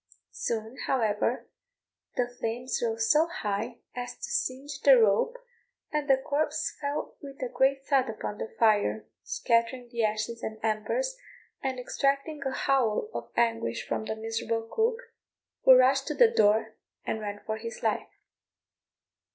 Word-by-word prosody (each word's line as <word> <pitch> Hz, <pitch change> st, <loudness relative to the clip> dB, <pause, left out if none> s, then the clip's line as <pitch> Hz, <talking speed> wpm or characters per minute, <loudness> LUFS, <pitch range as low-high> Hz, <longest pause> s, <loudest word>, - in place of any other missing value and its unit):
Soon, 225 Hz, +2 st, -3 dB
however, 230 Hz, -1 st, 0 dB, 0.7 s
the 245 Hz, -, +1 dB
flames 245 Hz, +1 st, -3 dB
rose 225 Hz, -1 st, 0 dB
so 315 Hz, +2 st, +5 dB
high 230 Hz, -, -3 dB
as 245 Hz, 0 st, -5 dB
to -, -, -6 dB
singe 280 Hz, -, -2 dB
the 275 Hz, -2 st, +8 dB
rope, 225 Hz, -, +3 dB, 0.5 s
and 300 Hz, -1 st, -1 dB
the 270 Hz, -, +6 dB
corpse 290 Hz, +3 st, -1 dB
fell 285 Hz, 0 st, -3 dB
with 275 Hz, -1 st, -10 dB
a -, -, 0 dB
great 270 Hz, +2 st, +1 dB
thud 265 Hz, -4 st, +2 dB
upon 215 Hz, -1 st, -5 dB
the -, -, -3 dB
fire, 215 Hz, -1 st, +3 dB, 0.2 s
scattering 235 Hz, +1 st, 0 dB
the 235 Hz, -2 st, -1 dB
ashes 215 Hz, +2 st, -1 dB
and 220 Hz, -, -4 dB
embers, 230 Hz, -, -1 dB, 0.4 s
and 265 Hz, -2 st, -2 dB
extracting 275 Hz, +4 st, -1 dB
a -, -, -1 dB
howl 270 Hz, -, +1 dB
of -, -, -5 dB
anguish 230 Hz, -1 st, 0 dB
from 220 Hz, -, -2 dB
the 220 Hz, -, -3 dB
miserable 225 Hz, +1 st, -2 dB
cook, 455 Hz, +2 st, +1 dB, 0.6 s
who 260 Hz, -, +10 dB
rushed 270 Hz, +1 st, +4 dB
to 300 Hz, -, -2 dB
the 475 Hz, -2 st, +6 dB
door, 220 Hz, -, +3 dB, 0.3 s
and 220 Hz, -, -2 dB
ran 205 Hz, -1 st, -4 dB
for 220 Hz, 0 st, -2 dB
his 230 Hz, +1 st, -7 dB
life. -, -, 0 dB
245 Hz, 150 wpm, -28 LUFS, 220-275 Hz, 0.7 s, who